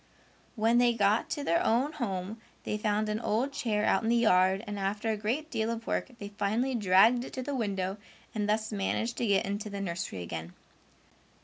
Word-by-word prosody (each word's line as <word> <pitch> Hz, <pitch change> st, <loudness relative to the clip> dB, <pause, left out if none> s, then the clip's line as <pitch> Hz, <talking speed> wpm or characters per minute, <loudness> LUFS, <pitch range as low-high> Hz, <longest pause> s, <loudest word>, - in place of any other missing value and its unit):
When 230 Hz, +1 st, +3 dB
they 240 Hz, -1 st, +4 dB
got 210 Hz, +8 st, +2 dB
to 295 Hz, -3 st, -3 dB
their 335 Hz, +5 st, +2 dB
own 260 Hz, +1 st, +2 dB
home 215 Hz, -6 st, -4 dB, 0.2 s
they -, -, -2 dB
found 210 Hz, 0 st, 0 dB
an 210 Hz, 0 st, -1 dB
old 240 Hz, +5 st, 0 dB
chair 210 Hz, -5 st, 0 dB
out -, -, +3 dB
in 225 Hz, -, -1 dB
the 235 Hz, -, +4 dB
yard 190 Hz, -3 st, +3 dB
and 205 Hz, -2 st, -5 dB
after 205 Hz, +3 st, -1 dB
a -, -, 0 dB
great 245 Hz, +10 st, -2 dB
deal 225 Hz, -2 st, -1 dB
of 230 Hz, 0 st, -4 dB
work -, -, -1 dB
they 205 Hz, -2 st, -7 dB
finally 210 Hz, +6 st, -1 dB
dragged 220 Hz, +3 st, +4 dB
it -, -, -9 dB
to 255 Hz, -, -4 dB
the 285 Hz, -, -4 dB
window 195 Hz, -5 st, -2 dB, 0.4 s
and 210 Hz, -1 st, -1 dB
thus 220 Hz, +1 st, 0 dB
managed 220 Hz, +3 st, -1 dB
to 235 Hz, -, 0 dB
get 200 Hz, -1 st, +3 dB
into 205 Hz, +2 st, -3 dB
the 200 Hz, -1 st, -5 dB
nursery 170 Hz, -, -4 dB
again. 85 Hz, 0 st, -6 dB
215 Hz, 205 wpm, -30 LUFS, 200-235 Hz, 0.4 s, they